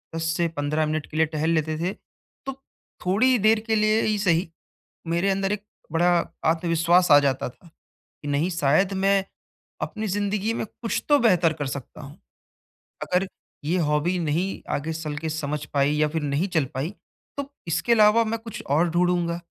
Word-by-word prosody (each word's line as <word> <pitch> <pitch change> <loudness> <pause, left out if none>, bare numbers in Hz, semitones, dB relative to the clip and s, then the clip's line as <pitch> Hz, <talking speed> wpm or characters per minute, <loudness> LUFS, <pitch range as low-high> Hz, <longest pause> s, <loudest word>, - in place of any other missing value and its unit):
10 165 - -2
से 170 -1 +2
15 150 +2 0
मिनट 155 0 -2
के 155 - -5
लिए 160 - +4
टहल 155 +1 -2
लेते 155 0 -1
थे, 180 +4 -1 0.5
तो 270 - -3 0.5
थोड़ी 245 +7 +3
देर 215 +2 +4
के 220 - +2
लिए 215 +1 +3
ही 215 -1 +1
सही, 175 -2 +2 0.6
मेरे 170 +4 +1
अंदर 195 0 0
एक 205 -1 -3 0.3
बड़ा 175 +2 +3 0.4
आत्मविश्वास 170 +2 +2
आ 145 - +10
जाता 135 -3 0
था, 170 +7 -20
कि 155 -2 -17
नहीं 145 +5 +1
शायद 170 +4 +2
मैं 195 -1 +3 0.6
अपनी 215 0 -3
ज़िंदगी 205 +2 -1
में - - -2
कुछ 230 +2 -4
तो 290 -1 +6
बेहतर 180 - +3
कर 145 - -1
सकता 135 -1 -7
हूँ। 140 -1 -11 0.8
अगर 185 +2 0 0.4
ये 170 +5 +1
हॉबी 155 +3 +1
नहीं 170 +4 -1
आगे 155 +3 -2
चल 155 -2 -5
के 160 - -4
समझ 150 -2 -3
पाई 140 +1 +3
या 150 0 +2
फिर 160 0 -3
नहीं 145 +7 0
चल 160 -5 +1
पाई, 135 +6 -2 0.5
तो 280 0 -5 0.2
इसके 235 +8 +1
अलावा 215 +1 +5
मैं 225 +1 -2
कुछ 225 -2 -8
और 165 +4 +3
ढूँढ़ूँगा, 175 0 +1
170 Hz, 180 wpm, -24 LUFS, 155-200 Hz, 0.8 s, आ